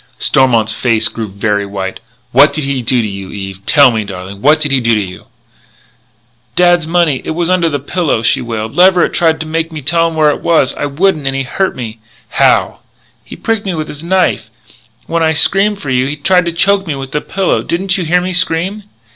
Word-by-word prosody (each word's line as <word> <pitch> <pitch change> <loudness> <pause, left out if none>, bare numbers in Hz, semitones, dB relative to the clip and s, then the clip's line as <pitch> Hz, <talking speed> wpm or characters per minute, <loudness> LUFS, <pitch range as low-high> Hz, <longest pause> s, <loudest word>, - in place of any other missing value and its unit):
Stormont's 115 -5 +2
face 115 -2 +1
grew 115 -1 -5
very 100 +1 -1
white: 100 -1 -5 0.3
"What 145 0 +5
did 155 0 -3
he 135 -1 -1
do 120 0 0
to - - -2
you, 100 -2 -7
Eve? 95 -1 -7
Tell 140 -4 +6
me, 110 -2 -1
darling. 100 0 -8
What 150 +5 +4
did 145 -2 -2
he 135 - +3
do 115 -2 +2
to - - +1
you?" 95 -3 -7 1.3
"Dad's 175 -2 +3
money 165 -5 +1
was 170 +2 -1
under 175 -3 +2
my 145 - -1
pillow," 145 -4 -1
she - - +2
wailed. 110 -2 -4
"Leverett 180 0 +4
tried 160 -2 +1
to - - -4
make 165 +1 -2
me 155 - -6
tell 165 +3 +1
where 155 -2 +3
it - - -5
was. 155 -6 +2
I 145 - -3
wouldn't, 155 0 0
and 135 - 0
he 135 - -1
hurt 190 +9 -2
me 115 -3 -7 0.2
" - - -33
"How?" - - +3 0.4
"He - - -11
pricked 225 -2 -2
me 185 - -1
with 155 -1 -4
his 150 +2 -9
knife. 185 +1 0 0.6
When 165 0 -1
I 160 0 +2
screamed 200 +6 +2
for 140 -8 -5
you 130 0 +1
he 145 - -3
tried 180 +4 +2
to 170 - -1
choke 195 +3 +1
me 150 - -2
with 135 -1 -7
the 150 - -2
pillow. 190 -1 -1
Didn't 180 +2 -1
you 185 - -1
hear 175 +2 +2
me 185 +1 -3
scream?" 185 +3 -1
150 Hz, 220 wpm, -13 LUFS, 115-175 Hz, 1.3 s, Tell